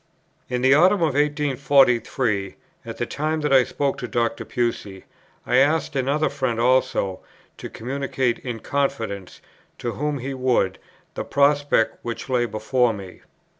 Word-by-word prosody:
In 125 Hz, 0 st, -2 dB
that 130 Hz, +1 st, +6 dB
autumn 180 Hz, +5 st, +4 dB
of 155 Hz, -4 st, +1 dB
1843, 135 Hz, -7 st, +1 dB, 0.3 s
at -, -, -8 dB
the -, -, -1 dB
time 155 Hz, +1 st, -2 dB
that 150 Hz, -2 st, +1 dB
I 130 Hz, -1 st, +7 dB
spoke 140 Hz, +1 st, -2 dB
to 125 Hz, -, -4 dB
Dr. 115 Hz, -1 st, -1 dB
Pusey, 115 Hz, -6 st, -3 dB, 0.4 s
I 125 Hz, -, +2 dB
asked 150 Hz, +3 st, +2 dB
another 140 Hz, +4 st, +1 dB
friend 125 Hz, -4 st, -2 dB
also 125 Hz, -6 st, +1 dB, 0.4 s
to -, -, -7 dB
communicate 130 Hz, 0 st, -2 dB
in 120 Hz, -3 st, -6 dB
confidence, 115 Hz, -10 st, -3 dB, 0.4 s
to 120 Hz, -, -3 dB
whom 150 Hz, +3 st, -2 dB
he 135 Hz, +1 st, -5 dB
would, 125 Hz, -8 st, 0 dB, 0.3 s
the -, -, -4 dB
prospect 145 Hz, -4 st, +2 dB
which 120 Hz, +3 st, -6 dB
lay 120 Hz, -2 st, +1 dB
before 115 Hz, +2 st, +1 dB
me. 95 Hz, -3 st, -10 dB
130 Hz, 145 wpm, -23 LUFS, 115-140 Hz, 0.4 s, I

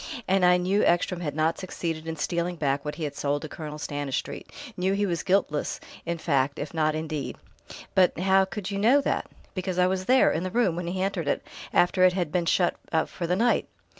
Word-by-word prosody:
And 190 Hz, 0 st, +3 dB
I 180 Hz, 0 st, +6 dB
knew 190 Hz, +3 st, +1 dB
Ekstrom 175 Hz, +1 st, +2 dB
had 145 Hz, -4 st, -3 dB
not 160 Hz, +1 st, +1 dB
succeeded 165 Hz, -3 st, -4 dB
in 160 Hz, -, -3 dB
stealing 170 Hz, +3 st, -1 dB
back 140 Hz, -3 st, 0 dB
what 150 Hz, -, -4 dB
he 165 Hz, -, -5 dB
had 145 Hz, -, -3 dB
sold 145 Hz, +1 st, -1 dB
to -, -, -4 dB
Colonel 150 Hz, -1 st, -7 dB
Stanistreet, 145 Hz, -2 st, -4 dB, 0.2 s
knew 185 Hz, +2 st, +1 dB
he 205 Hz, +1 st, +1 dB
was 170 Hz, -4 st, -1 dB
guiltless 185 Hz, -6 st, 0 dB, 0.3 s
in 170 Hz, 0 st, -1 dB
fact 140 Hz, -4 st, +1 dB
if 150 Hz, -, -5 dB
not 155 Hz, -1 st, +1 dB
in 160 Hz, +1 st, -3 dB
deed." 150 Hz, -3 st, -4 dB, 0.6 s
"But 185 Hz, -1 st, +4 dB
how 190 Hz, +2 st, +4 dB
could 190 Hz, +1 st, -5 dB
you 200 Hz, -, -2 dB
know 240 Hz, +7 st, +5 dB
that?" -, -, -1 dB, 0.3 s
"Because 185 Hz, -1 st, -3 dB
I 180 Hz, -, +5 dB
was 185 Hz, 0 st, 0 dB
there, 255 Hz, +4 st, +5 dB
in 160 Hz, -, -1 dB
the 185 Hz, -, -2 dB
room, 195 Hz, -5 st, +2 dB
when 175 Hz, 0 st, -4 dB
he 185 Hz, +2 st, -1 dB
entered 190 Hz, -5 st, -2 dB
it -, -, 0 dB, 0.3 s
after 180 Hz, +1 st, +3 dB
it 185 Hz, -1 st, +6 dB
had 175 Hz, -5 st, -1 dB
been 175 Hz, 0 st, 0 dB
shut 175 Hz, 0 st, +2 dB
up 160 Hz, -1 st, +1 dB
for 170 Hz, -, -4 dB
the 180 Hz, -, +2 dB
night." 235 Hz, +5 st, +2 dB
175 Hz, 225 wpm, -26 LUFS, 155-185 Hz, 0.6 s, I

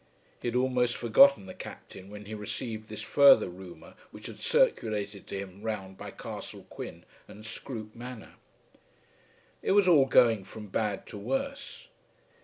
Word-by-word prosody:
He -, -, -3 dB
had 120 Hz, -, -2 dB
almost 125 Hz, -1 st, +1 dB
forgotten 275 Hz, -, +6 dB
the 185 Hz, -, -9 dB
Captain 95 Hz, -, -10 dB
when 105 Hz, 0 st, -10 dB
he 110 Hz, -, -7 dB
received 110 Hz, +1 st, -5 dB
this 105 Hz, 0 st, -6 dB
further 140 Hz, +4 st, +6 dB
rumour 90 Hz, -2 st, -11 dB, 0.2 s
which -, -, -12 dB
had -, -, -8 dB
circulated 105 Hz, -2 st, 0 dB
to 100 Hz, -, -5 dB
him 95 Hz, 0 st, -8 dB
round 105 Hz, -4 st, -4 dB
by -, -, -8 dB
Castle -, -, -8 dB
Quin -, -, -8 dB, 0.2 s
and 105 Hz, +1 st, -12 dB
Scroope 110 Hz, -1 st, -7 dB
Manor. 120 Hz, -1 st, -9 dB, 1.3 s
It -, -, +1 dB
was 200 Hz, -2 st, +5 dB
all 150 Hz, -7 st, +6 dB
going 115 Hz, -6 st, +5 dB
from 105 Hz, +1 st, -10 dB
bad 105 Hz, -1 st, -1 dB
to 105 Hz, -, -9 dB
worse. 275 Hz, -, -4 dB
110 Hz, 155 wpm, -29 LUFS, 105-130 Hz, 1.3 s, forgotten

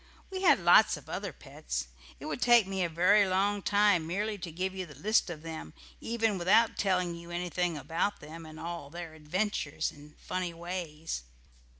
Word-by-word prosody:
We 380 Hz, -1 st, -4 dB
had 330 Hz, -7 st, +6 dB
lots 175 Hz, 0 st, +6 dB
of -, -, -14 dB
other -, -, -4 dB
pets; -, -, -5 dB, 0.3 s
it -, -, -9 dB
would 155 Hz, -, -4 dB
take 240 Hz, -3 st, +6 dB
me 190 Hz, -1 st, -1 dB
a 170 Hz, -, 0 dB
very 190 Hz, +5 st, +4 dB
long 200 Hz, +2 st, +1 dB
time 200 Hz, -4 st, +3 dB
merely 205 Hz, +5 st, -1 dB
to 170 Hz, -1 st, -6 dB
give 185 Hz, +4 st, -2 dB
you 185 Hz, -2 st, -5 dB
the 150 Hz, -, -12 dB
list 205 Hz, -, +2 dB
of 160 Hz, -2 st, -7 dB
them 160 Hz, -, -7 dB, 0.2 s
even 225 Hz, -4 st, 0 dB
without 215 Hz, +6 st, +4 dB
telling 180 Hz, -3 st, +1 dB
you 170 Hz, 0 st, -10 dB
anything 175 Hz, -1 st, -1 dB
about 165 Hz, +8 st, -1 dB
them, 160 Hz, +2 st, -10 dB
and 155 Hz, 0 st, -11 dB
all 170 Hz, -4 st, -6 dB
their 170 Hz, 0 st, -7 dB
adventures 155 Hz, -1 st, -2 dB
and 150 Hz, +1 st, -16 dB
funny 180 Hz, -2 st, -4 dB
ways. 165 Hz, -, -5 dB
175 Hz, 185 wpm, -30 LUFS, 160-200 Hz, 0.3 s, had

